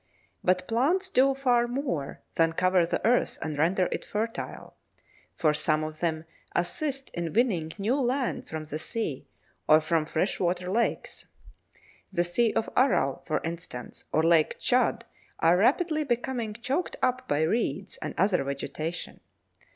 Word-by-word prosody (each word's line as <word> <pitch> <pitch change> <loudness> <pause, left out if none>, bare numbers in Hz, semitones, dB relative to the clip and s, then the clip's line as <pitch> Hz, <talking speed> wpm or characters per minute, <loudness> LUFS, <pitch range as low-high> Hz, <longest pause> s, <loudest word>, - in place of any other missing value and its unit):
But 185 0 +2
plants 335 +12 +1
do 270 +1 +4
far 245 -3 +2
more 240 - -3
than 165 0 +2
cover 185 0 +3
the - - -2
earth 240 +2 +2
and 155 -1 -3
render 175 +5 +2
it - - -3
fertile, 225 +2 -4 0.6
for 155 -3 +2
some 155 0 +1
of 155 0 -5
them 160 -2 -1 0.3
assist 270 - -2
in 170 -2 -3
winning 190 -9 +1
new 210 +4 0
land 255 +1 -1
from 160 0 -4
the 155 0 -5
sea 155 - -3 0.4
or 155 - +7
from 155 0 0
freshwater 180 +1 0
lakes. 235 +3 -1 0.8
The 175 -3 +2
Sea 215 +6 +2
of 225 - 0
Aral, 225 - +2
for 155 - 0
instance, 165 -7 -6
or 155 - +2
Lake 165 -2 +4
Tschad 245 -2 +2 0.3
are 165 +2 +4
rapidly 305 - +2
becoming 240 -4 -2
choked 260 +9 -2
up 255 0 +1
by 145 - +1
reeds 190 - -1
and - - -6
other 190 -4 +3
vegetation. 140 +4 -4
185 Hz, 145 wpm, -28 LUFS, 160-245 Hz, 0.8 s, or